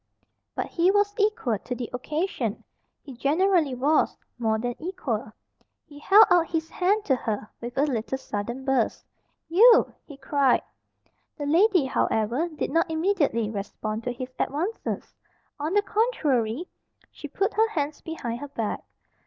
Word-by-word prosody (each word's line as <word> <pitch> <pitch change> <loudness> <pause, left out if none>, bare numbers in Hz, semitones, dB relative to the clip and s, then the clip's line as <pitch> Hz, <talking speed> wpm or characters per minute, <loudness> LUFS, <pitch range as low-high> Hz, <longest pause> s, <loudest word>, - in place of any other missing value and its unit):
But - - -1
he 345 +2 +2
was 410 +1 +2
equal 405 - +1
to 250 - -5
the 240 -1 -4
occasion. 305 +9 -2 0.4
He 275 - -10
generally 310 +2 +2
was 285 +5 +2 0.2
more 220 -2 +1
than 245 +2 -2
equal. 260 - -3 0.5
He 290 -1 -13
held 405 +8 +7
out 345 -2 +5
his 325 -1 -2
hand 405 +4 +1
to 270 - +3
her 215 -4 -3
with 240 +2 -7
a 275 - +4
little 265 -2 -1
sudden 240 +2 -5
burst. 265 -4 0 0.4
"You!" 450 +8 +6
he 285 - -12
cried. 280 -2 +2 0.7
The 290 - -4
lady, 355 +1 +4
however, 250 +4 0
did 310 - -4
not 330 +1 +2
immediately 315 - +1
respond 215 +2 -4
to 250 - -1
his 255 +1 -7
advances. 350 +11 -3 0.5
On 300 +3 -2
the 410 - +4
contrary, 310 - 0 0.4
she 295 - -9
put 395 +8 -1
her 445 +1 +3
hands 300 -6 -3
behind 240 -8 -5
her 290 - -6
back. 230 -7 -3
290 Hz, 150 wpm, -26 LUFS, 245-360 Hz, 0.7 s, held